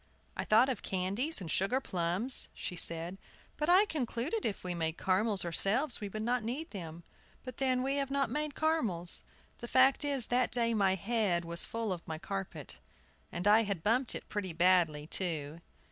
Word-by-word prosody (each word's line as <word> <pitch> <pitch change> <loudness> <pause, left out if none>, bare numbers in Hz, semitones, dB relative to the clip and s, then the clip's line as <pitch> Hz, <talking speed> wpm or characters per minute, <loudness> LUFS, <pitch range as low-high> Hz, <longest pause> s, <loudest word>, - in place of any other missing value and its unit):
"I - - -3
thought 225 +4 +5
of 255 -6 -2
candies 200 - -1
and 165 -4 -5
sugar 200 +8 +1
plums," 185 +3 +1
she 180 - -5
said; 170 +2 -2 0.4
"but 300 +2 -2
I 375 +4 +6
concluded 295 - -2
if 205 - -5
we 180 -1 -2
made 160 -1 -2
caramels 195 0 +1
ourselves 220 - +1
we 205 - -4
should 215 +2 -5
not 240 0 0
need 270 +9 -4
them. 170 -4 -8 0.4
But, 255 -2 -8
then, 255 -2 +1
we 275 +1 0
have 275 -1 -1
not 275 0 0
made 300 -1 -2
caramels. 225 - 0 0.4
The 240 - -7
fact 260 +4 +4
is, 280 -5 0
that 245 -1 +1
day 235 -1 +2
my 195 -3 +2
head 195 -4 0
was 170 +1 +3
full 225 -4 -2
of 175 0 -9
my 160 -1 -4
carpet. 160 - -6 0.5
I 205 +5 +4
had 200 -7 -3
bumped 240 +4 +2
it - - -7
pretty 195 -4 -4
badly, 170 -3 +3
too." 160 -3 -3
210 Hz, 180 wpm, -32 LUFS, 175-255 Hz, 0.5 s, I